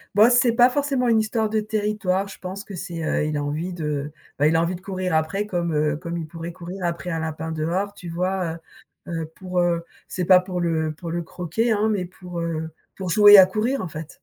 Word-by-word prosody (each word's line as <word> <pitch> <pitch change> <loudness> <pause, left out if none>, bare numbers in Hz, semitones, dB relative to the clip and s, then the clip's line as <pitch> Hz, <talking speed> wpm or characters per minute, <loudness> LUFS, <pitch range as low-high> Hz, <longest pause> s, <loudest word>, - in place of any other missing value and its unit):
B - - +1
oh, - - +6
c'est 245 -1 +4
pas 245 +1 +6
forcément 270 -2 0
une 225 -1 +4
histoire 220 0 0
de 220 - +1
territoire, 210 -2 -1
je - - -11
pense 190 +2 -6
que 200 - -11
c'est 170 -2 -5
heu, 150 - 0
il 150 0 -2
a 145 - -1
envie 155 +5 -3
de, 150 -3 -3 0.3
bah, 145 - +5
il 160 - +2
a 165 - +4
envie 170 +2 0
de - - -9
courir 185 -2 -3
après 160 +6 0
comme 175 -5 -2
heu, 150 0 +1
comme 170 +1 -5
il 165 - -4
pourrait 165 +2 -7
courir 180 +2 -6
après 170 +1 -3
un 165 -2 -2
lapin 160 0 -4
dehors, 170 +6 -1
tu 180 - -11
vois? 180 0 -1 0.5
Heu - - -6
heu 165 -1 -2
pour 185 -1 -3
heu, 170 -1 +1 0.2
c'est 180 - -3
pas 185 +1 +7
pour 180 -1 -4
le 160 -2 0
pour 165 +2 -7
le 170 +1 -1
croquer 180 +7 -2
hein, 215 +1 +1
mais 190 -4 -1
pour, 180 -1 -8
heu, 160 -1 -3 0.3
pour 185 -2 -5
jouer 205 +2 +9
à 190 - +10
courir 220 +8 -1
en - - -3
fait. 155 0 -7
180 Hz, 245 wpm, -23 LUFS, 165-200 Hz, 0.5 s, à